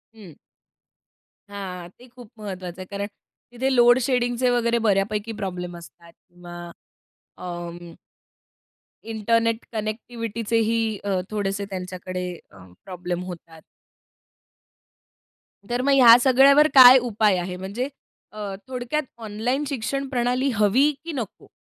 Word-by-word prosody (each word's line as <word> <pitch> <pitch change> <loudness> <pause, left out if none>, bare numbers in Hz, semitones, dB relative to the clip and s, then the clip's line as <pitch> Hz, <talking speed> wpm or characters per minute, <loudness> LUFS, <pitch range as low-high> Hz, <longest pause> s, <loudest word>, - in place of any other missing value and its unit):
हं. 200 -7 -13 1.2
हां, 185 -3 -7
ते 250 - -15
खूप 245 -4 -13
महत्वाचं 185 -3 -7
आहे - - -7
कारण 200 0 -3 0.4
तिथे 260 +2 -1
लोड 240 +1 +6
शेडिंगचे 245 -1 +1
वगैरे 235 -1 +1
बऱ्यापैकी 205 +2 0
प्रॉब्लेम 180 -2 -5
असतात 170 +1 -15
किंवा 175 -1 -12 0.7
अं 175 -1 -7 1.2
इंटरनेट 230 +1 0
कनेक्टिव्हिटी 225 +1 -4 0.2
ही 225 +1 +1 0.3
अ, 195 -2 0
थोडेसे 200 -1 -2
त्यांच्याकडे 180 -1 -5 0.2
अं, 95 -2 -16
प्रॉब्लेम 180 -1 -5
होतात. 165 -3 -10 2.1
तर 245 +1 -1
मग 280 +2 +1
ह्या 240 -4 +9
सगळ्यावर 275 +3 +6
काय 260 -1 +10
उपाय 215 -5 +1
आहे? 180 +1 -4
म्हणजे 200 +8 -4 0.4
अ, 205 -2 -6
थोडक्यात 255 +4 -3 0.2
ऑनलाईन 225 +6 -2
शिक्षण 275 +1 -3
प्रणाली 250 +1 0
हवी 220 +8 +3
की 335 - -4
नको? 230 -7 -6
215 Hz, 115 wpm, -23 LUFS, 180-245 Hz, 2.1 s, काय